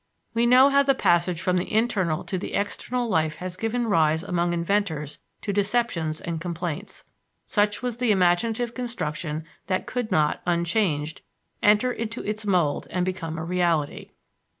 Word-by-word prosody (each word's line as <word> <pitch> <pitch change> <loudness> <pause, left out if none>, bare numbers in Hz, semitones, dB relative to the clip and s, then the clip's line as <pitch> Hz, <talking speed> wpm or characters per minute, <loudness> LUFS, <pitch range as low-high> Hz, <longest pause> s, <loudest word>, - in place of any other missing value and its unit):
We 230 +1 +2
know 255 +3 +7
how 280 0 +5
the 275 -1 +3
passage 175 -4 +2
from 180 +1 +1
the 180 - -2
internal 205 -8 +1
to 185 - -3
the - - -4
external 240 +4 -2
life 160 -6 +1
has 180 +2 -6
given 225 +5 -1
rise 160 -6 +2
among 175 -2 0
inventors 170 -4 -1 0.2
to 200 - -2
deceptions 195 -7 0
and 165 -2 -4
complaints. 170 -2 -5 0.4
Such 205 -2 +1
was 245 -2 -2
the 245 -1 0
imaginative 215 +5 +2
construction 160 -11 -4 0.2
that 185 -1 -1
could 245 -4 -3
not, 155 -4 +2
unchanged, 170 -3 0 0.4
enter 210 +4 +4
into 230 +1 -4
its 210 0 -3
mould 175 -7 +1
and 180 0 -1
become 165 -3 -4
a 160 - -4
reality. 170 -4 0
185 Hz, 155 wpm, -25 LUFS, 165-225 Hz, 0.4 s, know